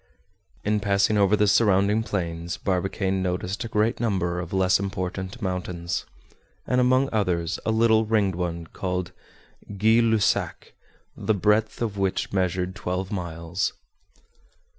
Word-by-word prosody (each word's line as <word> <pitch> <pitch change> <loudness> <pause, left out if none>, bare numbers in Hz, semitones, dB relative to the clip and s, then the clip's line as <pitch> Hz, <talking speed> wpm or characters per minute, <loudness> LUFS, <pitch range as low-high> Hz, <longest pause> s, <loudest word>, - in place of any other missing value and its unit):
In 105 0 +1
passing 100 +1 +2
over 100 0 +4
the 105 - +3
surrounding 100 0 +3
plains, 85 -6 -3
Barbicane 95 0 -1
noticed 90 +4 -2
a - - -4
great 110 +1 +1
number 95 -6 0
of 90 -1 -6
less 95 -1 +3
important 95 +2 -4
mountains; 90 -2 -3 0.6
and 125 0 +2
among 130 +2 +3
others 90 -6 0
a - - +3
little 110 -1 +3
ringed 105 -3 +2
one 85 -1 -3
called 90 +2 -3 0.7
Guy 110 +3 +4
Lussac, 110 -3 +1 0.4
the 110 - 0
breadth 105 +3 +1
of 100 -3 -3
which 95 0 -1
measured 95 -1 0
twelve 95 -1 -3
miles. 85 -1 -3
95 Hz, 130 wpm, -25 LUFS, 90-105 Hz, 0.7 s, over